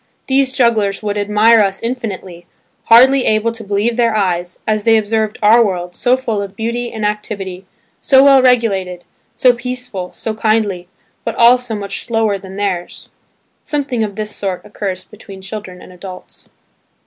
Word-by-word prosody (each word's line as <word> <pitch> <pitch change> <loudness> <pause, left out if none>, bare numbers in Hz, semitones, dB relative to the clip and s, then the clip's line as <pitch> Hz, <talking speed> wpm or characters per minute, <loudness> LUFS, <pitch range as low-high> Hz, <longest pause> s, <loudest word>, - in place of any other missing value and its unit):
These 265 0 +2
jugglers 220 -6 +1
would 205 -1 -2
admire 210 +3 +4
us 195 -2 +1
infinitely, 195 -8 -5 0.4
hardly 260 +3 +6
able 215 +1 +1
to 230 -1 -10
believe 205 +4 -1
their 230 -2 +2
eyes, 180 -3 -1
as 215 -1 0
they 225 0 +4
observed 215 0 -1
our 225 +3 +6
world, 180 -4 -3
so 250 +1 +2
full 225 -5 -2
of 200 0 -7
beauty 235 +2 -3
and 220 -2 -4
activity, 195 -3 -4 0.3
so 270 -1 +5
well 275 -1 +6
regulated, 200 -8 +1 0.3
so 250 -1 +4
peaceful, 245 -6 -6
so 220 - -5
kindly, 215 -5 0 0.4
but - - -3
all 240 +2 +6
so 245 -3 -4
much 200 -2 -4
slower 225 -3 0
than 190 0 -11
theirs. 195 -3 -4 0.5
Something 270 -6 -2
of 205 -2 -4
this 210 0 -4
sort 190 -3 -4
occurs 195 -3 -5
between 195 0 -13
children 190 -2 -8
and 185 - -14
adults. 180 0 -11
215 Hz, 160 wpm, -16 LUFS, 195-235 Hz, 0.5 s, hardly